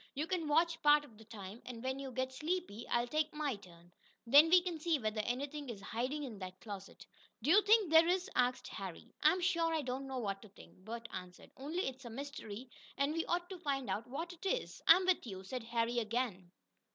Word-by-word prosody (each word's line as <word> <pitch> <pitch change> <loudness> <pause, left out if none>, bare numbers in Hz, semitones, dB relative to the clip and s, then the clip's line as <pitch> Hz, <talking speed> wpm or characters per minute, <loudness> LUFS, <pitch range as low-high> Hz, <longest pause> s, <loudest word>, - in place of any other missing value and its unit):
You 295 +3 -1
can 335 -3 -1
watch 330 +2 +2
part 295 -1 +6
of 225 -6 -18
the 220 - -13
time, 210 0 -9
and 240 -2 -8
when 260 +1 -2
you 270 -1 -5
get 260 +1 -2
sleepy 310 - -3
I'll 240 0 +2
take 305 +4 0
my 295 -5 -1
turn. 175 -3 -17 0.3
Then 285 +7 +8
we 360 +2 +8
can 350 -3 -3
see 325 0 +2
whether 215 -3 -1
anything 275 +5 -3
is 220 -4 -6
hiding 255 +9 -3
in 230 -7 -6
that 185 -1 -7
closet." 200 -3 -9 0.4
"Do 290 - +3
you 405 +4 +8
think 420 -4 +4
there 325 +1 +8
is?" 365 +1 +1
asked 250 0 +1
Harry. - - -7
"I'm 365 - +4
sure 335 -2 +2
I 320 -2 0
don't 260 +1 -3
know 265 -1 -4
what 200 -5 -2
to 215 - -13
think," 200 - -16
Bert 230 +4 -7
answered. 180 0 -8
"Only 310 +8 -2
it's 265 0 -6
a - - -6
mystery, 255 -2 -7 0.3
and 280 +2 +1
we 330 0 -1
ought 350 0 0
to 370 - -6
find 270 - -1
out 210 +5 -2
what 325 +7 -5
it 335 - -15
is." 485 +6 -2
"I'm 365 +3 +8
with 365 -8 +2
you," 190 -3 -6
said 250 +6 -4
Harry 235 +1 0
again. 220 -5 -2
265 Hz, 225 wpm, -35 LUFS, 225-325 Hz, 0.4 s, Then